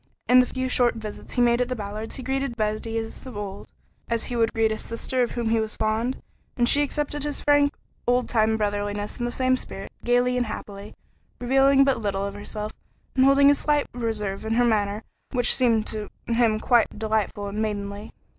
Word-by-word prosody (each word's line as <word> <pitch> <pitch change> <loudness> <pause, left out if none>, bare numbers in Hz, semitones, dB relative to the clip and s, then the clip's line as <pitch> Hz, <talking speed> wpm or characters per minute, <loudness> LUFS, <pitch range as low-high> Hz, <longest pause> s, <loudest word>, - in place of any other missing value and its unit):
In 250 +1 +7
the 250 - +4
few 260 0 -3
short 245 -2 +3
visits 215 -2 -8
he 245 - +3
made 240 0 +3
at 250 - +1
the 255 - -1
Ballards' 215 0 -5
he 260 - -6
greeted 265 -2 -2
Betty 215 +1 -2
as 225 +3 -5
of 245 -5 -8
old, 200 -1 -6 0.4
as 230 -1 -1
he 245 - -4
would 230 -1 +2
greet 225 -1 +1
a - - +1
little - - -4
sister 240 +3 -2
of 240 - 0
whom 235 -2 -1
he 225 - +3
was 220 -1 -2
fond, 220 +4 -1 0.3
and 240 -1 +3
she 285 - +5
accepted 290 0 -2
his 295 -1 -2
frank, 290 -1 +4 0.4
old 245 +1 +2
time 220 -1 +2
brotherliness 205 0 -2
in 240 - -1
the 240 - -2
same 255 +1 +2
spirit, 195 -6 -7
gayly 245 +1 +2
and 245 -2 0
happily, 200 -1 -8 0.4
revealing 270 +2 +4
but 275 -3 +2
little 200 -2 -1
of 200 - -4
herself, 210 +1 -5 0.4
and 260 0 +5
holding 280 +1 +6
a - - +6
slight 295 0 +1
reserve 220 -5 -3
in 220 +1 -1
her 245 +1 +4
manner 210 -1 0 0.3
which 245 -2 +4
seemed 230 -4 +3
to 215 -2 -4 0.2
him 230 -2 +2
quite 235 -2 +2
delightful 215 -1 -1
and 205 +2 -3
maidenly. 205 -1 -4
230 Hz, 210 wpm, -25 LUFS, 215-250 Hz, 0.4 s, In